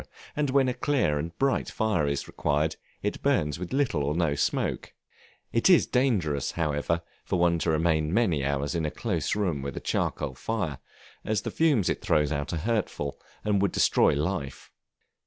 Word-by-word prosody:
and 145 Hz, -2 st, 0 dB
when 135 Hz, 0 st, +3 dB
a 125 Hz, -, +1 dB
clear 125 Hz, -, +1 dB
and 80 Hz, +3 st, -5 dB
bright 135 Hz, 0 st, +1 dB
fire 105 Hz, -10 st, 0 dB
is 70 Hz, -1 st, -2 dB
required, 75 Hz, +2 st, 0 dB
as -, -, -8 dB, 0.3 s
it -, -, -2 dB
burns 75 Hz, +1 st, +1 dB
with 90 Hz, -, -6 dB
little 130 Hz, -, +1 dB
or 75 Hz, +2 st, -1 dB
no 80 Hz, -4 st, +1 dB
smoke; 70 Hz, -, -1 dB, 0.6 s
it 115 Hz, +9 st, +3 dB
is 180 Hz, -, +6 dB
dangerous, 100 Hz, -, +1 dB
however, 80 Hz, +1 st, -1 dB, 0.2 s
for -, -, -1 dB
one 85 Hz, -1 st, +3 dB
to 80 Hz, -, 0 dB
remain 80 Hz, -1 st, +2 dB
many 90 Hz, -, +2 dB
hours 70 Hz, +2 st, -1 dB
in 85 Hz, -2 st, -1 dB
a 75 Hz, -, 0 dB
close 90 Hz, -, -2 dB
room 90 Hz, -9 st, 0 dB
with 70 Hz, +1 st, -5 dB
a -, -, -1 dB
charcoal 65 Hz, -, -1 dB
fire, 80 Hz, -, -3 dB, 0.4 s
as 105 Hz, -3 st, -1 dB
the -, -, -3 dB
fumes 145 Hz, -, +2 dB
it -, -, -1 dB
throws 75 Hz, -1 st, +2 dB
out 70 Hz, -1 st, -2 dB
are 85 Hz, -, -2 dB
hurtful, 95 Hz, -7 st, -2 dB, 0.3 s
and 105 Hz, -2 st, +2 dB
would 100 Hz, -, +2 dB
destroy -, -, +3 dB
life. 75 Hz, -3 st, -3 dB
85 Hz, 185 wpm, -27 LUFS, 75-110 Hz, 0.6 s, is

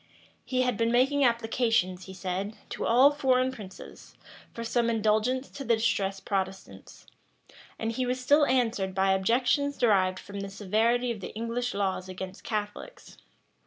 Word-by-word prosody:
He 255 Hz, -1 st, 0 dB
had 250 Hz, -4 st, 0 dB
been 230 Hz, 0 st, +1 dB
making 270 Hz, +4 st, +3 dB
applications, 225 Hz, -6 st, +1 dB
he 190 Hz, -, -9 dB
said, 190 Hz, +3 st, -4 dB, 0.2 s
to -, -, -3 dB
all 255 Hz, +5 st, +6 dB
foreign 260 Hz, -3 st, +2 dB
princes, 200 Hz, -7 st, -11 dB, 0.4 s
for 230 Hz, -, -6 dB
some 235 Hz, 0 st, +1 dB
indulgence 225 Hz, +4 st, +1 dB
to 280 Hz, -, -8 dB
the 235 Hz, -3 st, +3 dB
distressed 195 Hz, -3 st, -1 dB
Protestants; 190 Hz, -1 st, -5 dB, 0.7 s
and 225 Hz, 0 st, -2 dB
he 255 Hz, +2 st, -2 dB
was 250 Hz, +1 st, -1 dB
still 290 Hz, +3 st, +4 dB
answered 225 Hz, -7 st, 0 dB
by 190 Hz, 0 st, +3 dB
objections 245 Hz, +9 st, +1 dB
derived 190 Hz, -5 st, +3 dB
from 200 Hz, +2 st, -8 dB
the 195 Hz, 0 st, -5 dB
severity 225 Hz, +5 st, +1 dB
of 225 Hz, -, -5 dB
the 185 Hz, -, -7 dB
English 230 Hz, +2 st, -3 dB
laws 190 Hz, -2 st, -2 dB
against 185 Hz, 0 st, -7 dB
Catholics. 215 Hz, -, -6 dB
225 Hz, 155 wpm, -28 LUFS, 195-250 Hz, 0.7 s, all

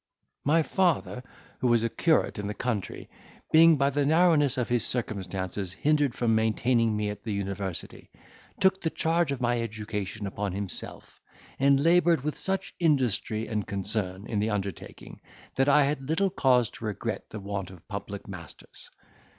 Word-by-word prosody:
"My 160 Hz, +3 st, +3 dB
father, 170 Hz, -8 st, 0 dB, 0.4 s
who 125 Hz, -, +1 dB
was 120 Hz, -1 st, +3 dB
a -, -, +2 dB
curate 160 Hz, -7 st, +1 dB
in 100 Hz, -, -3 dB
the 105 Hz, -, -4 dB
country, 110 Hz, -7 st, -3 dB, 0.4 s
being 165 Hz, 0 st, +7 dB
by 140 Hz, +1 st, +2 dB
the 145 Hz, +1 st, +1 dB
narrowness 150 Hz, -3 st, +3 dB
of 125 Hz, -, 0 dB
his 120 Hz, -2 st, +1 dB
circumstances 95 Hz, -5 st, -2 dB
hindered 145 Hz, +3 st, +1 dB
from 115 Hz, -2 st, +1 dB
maintaining 110 Hz, 0 st, +2 dB
me 105 Hz, -1 st, -1 dB
at 105 Hz, -, -10 dB
the 110 Hz, -, -4 dB
university, 100 Hz, -3 st, -5 dB, 0.5 s
took 190 Hz, -1 st, +3 dB
the 160 Hz, -, 0 dB
charge 165 Hz, -1 st, 0 dB
of 135 Hz, -2 st, -3 dB
my 120 Hz, -1 st, +1 dB
education 105 Hz, -2 st, -4 dB
upon 100 Hz, -1 st, -3 dB
himself, 100 Hz, -2 st, -5 dB, 0.4 s
and 140 Hz, 0 st, +4 dB
laboured 170 Hz, -2 st, +4 dB
with 150 Hz, 0 st, -2 dB
such 195 Hz, 0 st, -2 dB
industry 125 Hz, -, +1 dB
and 105 Hz, -3 st, -3 dB
concern 100 Hz, -1 st, -3 dB
in 110 Hz, -3 st, -2 dB
the 105 Hz, +2 st, 0 dB
undertaking, 100 Hz, -4 st, -6 dB, 0.3 s
that 135 Hz, +1 st, +2 dB
I 145 Hz, +1 st, +6 dB
had 140 Hz, 0 st, -1 dB
little 190 Hz, +4 st, +1 dB
cause 125 Hz, -, +3 dB
to -, -, -9 dB
regret 105 Hz, -3 st, -4 dB
the 110 Hz, -, -7 dB
want 100 Hz, -2 st, -4 dB
of 90 Hz, -3 st, -15 dB
public 100 Hz, -1 st, -6 dB
masters. 85 Hz, -5 st, -10 dB
115 Hz, 165 wpm, -27 LUFS, 100-145 Hz, 0.5 s, being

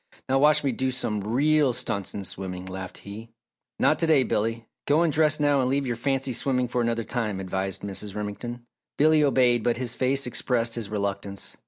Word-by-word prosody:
Now, 135 Hz, +1 st, +2 dB
watch 150 Hz, +1 st, +5 dB
me 140 Hz, -, +1 dB
do 130 Hz, +2 st, -1 dB
some 110 Hz, -5 st, -2 dB
real 140 Hz, +5 st, +2 dB
stunts 100 Hz, -5 st, -2 dB
in 100 Hz, -, -4 dB
swimming," 90 Hz, -1 st, -5 dB
laughed 95 Hz, 0 st, -7 dB
he. 110 Hz, +3 st, -9 dB, 0.5 s
"Not -, -, +2 dB
to 165 Hz, -, +1 dB
day, 150 Hz, -4 st, +5 dB
Billy. 115 Hz, 0 st, -1 dB, 0.2 s
Go 150 Hz, +4 st, +4 dB
and 160 Hz, -3 st, +1 dB
dress 155 Hz, 0 st, +3 dB
now 145 Hz, -2 st, +3 dB
and 125 Hz, -, 0 dB
leave 140 Hz, +1 st, 0 dB
your 120 Hz, -2 st, -1 dB
fancy 135 Hz, +1 st, -1 dB
swimming 125 Hz, 0 st, +1 dB
for 120 Hz, 0 st, -1 dB
another 115 Hz, 0 st, 0 dB
time," 110 Hz, -5 st, -3 dB
advised 95 Hz, 0 st, -3 dB
Mrs. 100 Hz, 0 st, -4 dB
Remington. 120 Hz, +4 st, -5 dB, 0.3 s
Billy 155 Hz, +1 st, +4 dB
obeyed 125 Hz, -4 st, +3 dB
but 120 Hz, -, +1 dB
his 125 Hz, -1 st, -1 dB
face 135 Hz, +2 st, +1 dB
expressed 120 Hz, -1 st, 0 dB
his 115 Hz, -4 st, -4 dB
reluctance. 100 Hz, -1 st, -4 dB
120 Hz, 195 wpm, -25 LUFS, 105-135 Hz, 0.5 s, watch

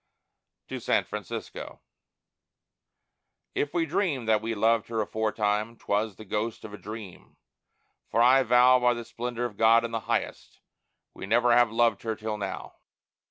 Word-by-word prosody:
TO -, -, -5 dB
SAN -, -, +1 dB
FRANCISCO -, -, -7 dB, 1.7 s
If 145 Hz, -, -1 dB
we 170 Hz, -1 st, 0 dB
dreamed 160 Hz, -, -1 dB
that 110 Hz, -1 st, +3 dB
we 115 Hz, +1 st, -3 dB
loved 110 Hz, +1 st, +2 dB
Her 115 Hz, -1 st, -3 dB
aforetime, 110 Hz, +1 st, -1 dB
'twas 105 Hz, 0 st, -1 dB
the 110 Hz, -, -12 dB
ghost 110 Hz, +3 st, -3 dB
of 105 Hz, -, -9 dB
a -, -, -7 dB
dream; 105 Hz, -3 st, -10 dB, 0.7 s
for 115 Hz, -, 0 dB
I 125 Hz, +3 st, +6 dB
vow 125 Hz, +1 st, +5 dB
By 125 Hz, 0 st, +3 dB
the 120 Hz, -1 st, -6 dB
splendor 120 Hz, +1 st, -4 dB
of 105 Hz, -4 st, -6 dB
God 115 Hz, +1 st, +5 dB
in 115 Hz, -, -5 dB
the 115 Hz, -, -1 dB
highest, -, -, -3 dB, 0.5 s
we -, -, -8 dB
never 120 Hz, +3 st, +3 dB
have 120 Hz, -2 st, +4 dB
loved 115 Hz, -2 st, +2 dB
Her 110 Hz, -1 st, -3 dB
till 110 Hz, 0 st, -4 dB
now. 100 Hz, -1 st, -6 dB
115 Hz, 160 wpm, -27 LUFS, 110-120 Hz, 1.7 s, I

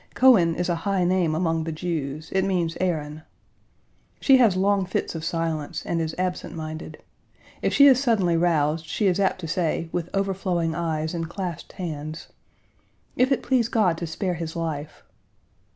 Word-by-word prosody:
Cohen 200 Hz, -11 st, +5 dB
is 175 Hz, +1 st, -1 dB
a 175 Hz, -2 st, 0 dB
high 195 Hz, -1 st, +1 dB
name 175 Hz, -3 st, +2 dB
among 165 Hz, -1 st, 0 dB
the 165 Hz, -, -3 dB
Jews: 155 Hz, -3 st, -4 dB
it 190 Hz, 0 st, +1 dB
means 175 Hz, -4 st, 0 dB
Aaron. 155 Hz, -4 st, -2 dB, 1.0 s
She 270 Hz, -2 st, +6 dB
has 230 Hz, -7 st, +4 dB
long 200 Hz, +1 st, +2 dB
fits 185 Hz, -, -2 dB
of 165 Hz, -1 st, -6 dB
silence, 165 Hz, -1 st, -3 dB
and 165 Hz, -1 st, -1 dB
is 160 Hz, 0 st, -3 dB
absent 180 Hz, -1 st, -3 dB
minded. 155 Hz, 0 st, -7 dB, 0.6 s
If -, -, +1 dB
she 280 Hz, -, +6 dB
is 265 Hz, -2 st, +6 dB
suddenly 205 Hz, -10 st, +2 dB
roused, 160 Hz, -2 st, +1 dB
she 210 Hz, -, -1 dB
is 185 Hz, -1 st, +2 dB
apt 190 Hz, -1 st, +1 dB
to 165 Hz, -, -5 dB
say, 165 Hz, 0 st, -1 dB
with 175 Hz, -1 st, -3 dB
overflowing 185 Hz, -4 st, 0 dB
eyes 160 Hz, -1 st, -2 dB
and 165 Hz, -1 st, -3 dB
clasped 175 Hz, -3 st, -6 dB
hands, 155 Hz, -4 st, -6 dB, 0.9 s
"If 255 Hz, +2 st, +2 dB
it 270 Hz, -, +1 dB
please 250 Hz, -4 st, +2 dB
God 215 Hz, -8 st, +2 dB
to 170 Hz, -, -3 dB
spare 180 Hz, +3 st, -2 dB
his 165 Hz, -1 st, -5 dB
life." 155 Hz, -2 st, -4 dB
170 Hz, 170 wpm, -24 LUFS, 160-190 Hz, 1.0 s, She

